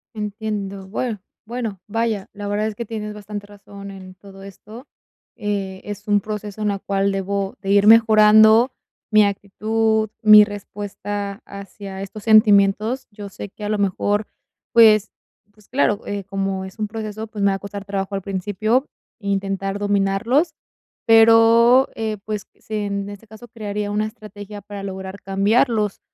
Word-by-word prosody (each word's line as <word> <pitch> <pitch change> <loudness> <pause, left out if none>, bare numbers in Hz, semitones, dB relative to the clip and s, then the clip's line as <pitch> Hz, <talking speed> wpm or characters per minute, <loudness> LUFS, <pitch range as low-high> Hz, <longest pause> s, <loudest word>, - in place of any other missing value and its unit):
Entiendo. 205 -2 -5
Bueno 220 +1 -3 0.3
bueno, 230 -5 -4
vaya, 220 -2 -1
la 205 0 -6
verdad 205 +1 -1
es 220 - -2
que 235 +2 -6
tienes 210 -2 -5
bastante 205 0 -7
razón 200 -1 -11
en 185 -1 -11
todo 195 0 -14
esto, 210 +6 -12 0.5
eh, 200 -3 -3
es 205 +1 -8
un 205 0 +3
proceso 210 0 -6
en 210 - +1
la 200 - -2
cual 195 0 0
debo 195 0 -2
de 195 - -5
ir 200 0 +4
mejorando 220 +2 +6 0.4
mi 215 -1 +6
actitud, 220 +2 0
mi 215 -1 +9
respuesta 205 0 -6
hacia 200 -1 -9
estos 200 +1 -8
sentimientos. 215 +2 +4
Yo 205 -1 -9
sé 200 0 -8
que 210 - -12
a 210 - -2
lo 215 - 0
mejor, 205 +1 0 0.5
pues 215 -3 +6 0.4
pues 210 -1 -23
claro, 225 -6 +1
eh, 200 -1 -3
como 195 -1 -3
es 190 +3 -12
un 210 - -1
proceso, 215 0 -6
pues 210 -2 -5
me 200 - +4
va - - 0
a 195 - -6
costar 200 -1 -8
trabajo 195 0 -3
al 195 - -3
principio 205 +7 -1 0.3
intentar 195 -1 -2
dominarlos, 205 - +1 0.5
pero, 230 +3 +6
eh, 220 -1 -3
pues, 215 -1 -4
sí, 215 - -12
en 200 -1 -3
este 205 +2 -11
caso, 220 +3 -13
crearía 210 -2 -4
una 215 +1 0
estrategia 210 -1 -10
para 205 -1 -8
lograr 190 0 -7
cambiarlos. 210 +2 +1
205 Hz, 160 wpm, -21 LUFS, 200-215 Hz, 0.5 s, mi